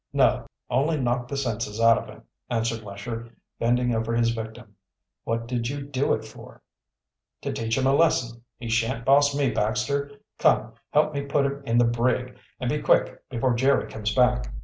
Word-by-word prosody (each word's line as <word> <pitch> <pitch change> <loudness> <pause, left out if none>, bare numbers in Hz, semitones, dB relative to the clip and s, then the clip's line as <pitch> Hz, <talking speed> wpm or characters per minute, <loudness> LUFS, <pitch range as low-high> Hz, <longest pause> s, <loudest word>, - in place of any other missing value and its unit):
"No; - - +3 0.2
only 145 +5 +1
knocked 120 -1 0
the 140 - -3
senses 115 -4 -2
out 115 0 +6
of - - -9
him," - - -13 0.3
answered 115 -1 -1
Lesher, 115 +3 -7 0.2
bending 125 +1 +2
over 115 +1 -1
his 115 0 +3
victim. 110 -1 -7 0.5
"What 115 0 -1
did 120 -1 -2
you 140 0 -4
do 140 0 0
it - - -7
for?" - - -13 0.8
"To - - -2
teach 115 +1 -1
him 130 - +1
a 135 - +4
lesson. 125 -7 +2 0.2
He 120 - -7
shan't 115 +1 0
boss 140 +1 +5
me, 140 -3 +2
Baxter. 125 +6 -1 0.3
Come, - - +3 0.2
help 150 +1 +2
me 140 - -1
put 140 0 +1
him 140 +1 -2
in 115 - +2
the 120 - +5
brig, 125 +2 0 0.2
and 125 - -2
be 150 +4 0
quick, - - +2
before 125 0 0
Jerry 135 +4 +2
comes 110 0 -2
back." 125 - +2
120 Hz, 185 wpm, -25 LUFS, 115-140 Hz, 0.8 s, out